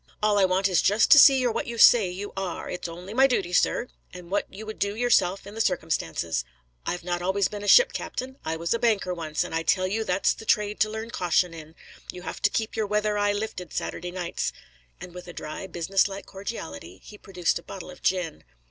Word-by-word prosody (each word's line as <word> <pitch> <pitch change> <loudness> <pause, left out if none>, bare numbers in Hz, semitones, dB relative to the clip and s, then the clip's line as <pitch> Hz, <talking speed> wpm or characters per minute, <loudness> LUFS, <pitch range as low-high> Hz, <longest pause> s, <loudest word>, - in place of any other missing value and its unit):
All 210 -1 +3
I 195 - +5
want 185 +1 +2
is 185 -2 +2
just 205 +3 +3
to 295 - +10
see 270 -1 +8
you're 250 -2 +1
what - - -3
you 235 0 -5
say 220 -4 +7
you 195 +3 -6
are; 190 -3 -4
it's 180 - -4
only 175 +4 -9
my 265 +3 +5
duty, 195 -9 -1
sir, 235 - +2 0.3
and 180 -1 -11
what 205 - -1
you 210 +3 -9
would 215 0 -8
do 200 +1 -1
yourself 215 -6 +2
in 200 - -10
the 225 - -2
circumstances. 85 - -1 0.4
I've 175 0 -2
not 175 0 -2
always 190 +2 +1
been 205 -1 -7
a - - -5
ship - - +7
captain: 260 +1 -5
I 160 +1 -2
was 170 +4 -1
a 230 - -1
banker 215 -6 +1
once, 155 -3 -2
and - - -7
I 165 - 0
tell 185 +3 +2
you 215 +4 -1
that's 185 -2 +1
the - - -11
trade 210 -1 +1
to 215 - +3
learn 220 +2 -6
caution 180 -2 +1
in. 160 0 -11 0.4
You 180 0 -10
have - - -6
to 205 - +4
keep 220 +1 -2
your 220 -2 -1
weather 210 0 0
eye 205 0 +2
lifting 205 -4 -5
Saturday 180 - -4
nights." 175 -1 -3 0.5
And 180 - -10
with 180 0 -10
a 175 - -8
dry, 155 +5 -7
business 185 +3 +1
like 195 0 -8
cordiality, 95 - -7
he 210 - -13
produced 180 -3 -1
a - - -14
bottle 185 -2 -9
of 180 - -14
gin. 180 -4 -1
195 Hz, 235 wpm, -26 LUFS, 175-215 Hz, 0.5 s, to